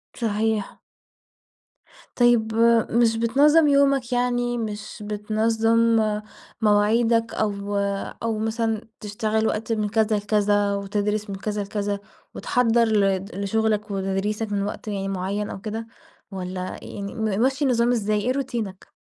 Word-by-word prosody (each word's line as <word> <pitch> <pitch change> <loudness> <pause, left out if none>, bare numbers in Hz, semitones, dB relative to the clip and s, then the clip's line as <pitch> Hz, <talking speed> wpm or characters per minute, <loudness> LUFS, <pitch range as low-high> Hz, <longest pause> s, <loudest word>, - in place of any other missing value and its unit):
صحيح. 220 -2 -1 1.4
طيب، 240 -3 +3 0.4
مش 230 -1 +3
بتنظّم 290 +7 +4
يومك، 275 -3 +3
يعني 245 0 0
مش 215 -1 -5
بتنظّم 225 +2 +2 0.6
مواعيدك 225 +2 +3
أو 205 -1 -2 0.5
أو 225 -2 -1
مثلًا 225 0 -1 0.2
تشتغل 215 +1 -1
وقت 220 +2 -2
من 210 -1 -1
كذا 220 0 +2
لكذا 205 0 +1
وتدرِس 205 +1 -2
من 195 - -4
كذا 210 +1 -3
لكذا 200 0 -3 0.4
وتحضَّر 235 -1 +2
لد 195 -2 +1
لشُغلك 210 +1 0
وتدريسك 200 +3 -2
من 200 -1 0
وقت 210 +1 -5
يعني 195 -2 -3
معيّن 195 +2 -2
أو 190 - -7
كده 225 +1 -5 0.4
والّا 185 -1 -5
يعني 200 +1 -7
مِمَشِّي 235 +6 0
النظام 240 -2 +2
إزاي؟ 215 -3 +1
إيه 250 +4 0
روتينك؟ 240 -8 -4
215 Hz, 120 wpm, -23 LUFS, 205-230 Hz, 1.4 s, بتنظّم